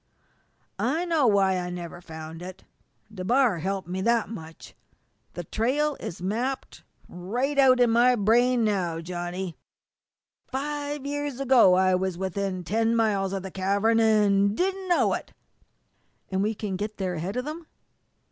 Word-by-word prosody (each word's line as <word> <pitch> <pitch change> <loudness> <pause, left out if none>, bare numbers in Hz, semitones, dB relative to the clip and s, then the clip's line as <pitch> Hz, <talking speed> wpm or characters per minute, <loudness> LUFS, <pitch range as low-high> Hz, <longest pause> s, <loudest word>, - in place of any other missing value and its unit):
I 315 +9 0
know 320 -7 +2
why 195 -3 +3
I 180 0 -4
never 175 -1 -7
found 160 0 -9
it. 185 +1 -9 0.5
DeBar 215 +1 +2
helped 190 +1 -3
me 185 +1 -3
that 235 +2 +1
much. 165 -7 -10 0.6
The 175 - -4
trail 275 - 0
is 175 0 -7
mapped 240 +8 -3 0.2
right 240 +11 -3
out 260 -2 +6
in 245 -2 +4
my 245 +2 +5
brain 240 +3 +3
now, 185 -6 0
Johnny. 175 +1 -5 0.9
Five 290 +1 -4
years 290 -2 -3
ago 255 -9 +5
I 185 0 +3
was 185 -1 -1
within 190 0 -3
ten 225 +5 +1
miles 205 -4 +1
of 195 -1 -3
the 190 - -7
cavern 200 +5 +1
an' 205 -2 +3
didn't 380 +3 -1
know 350 - +3
it!" - - -5 1.0
"And 190 0 0
we 215 +2 0
can 200 -3 -4
get 210 +2 -5
there 185 -2 -2
ahead 175 +4 -4
of 250 - -2
them?" 310 +2 -7
205 Hz, 150 wpm, -26 LUFS, 185-250 Hz, 1.0 s, out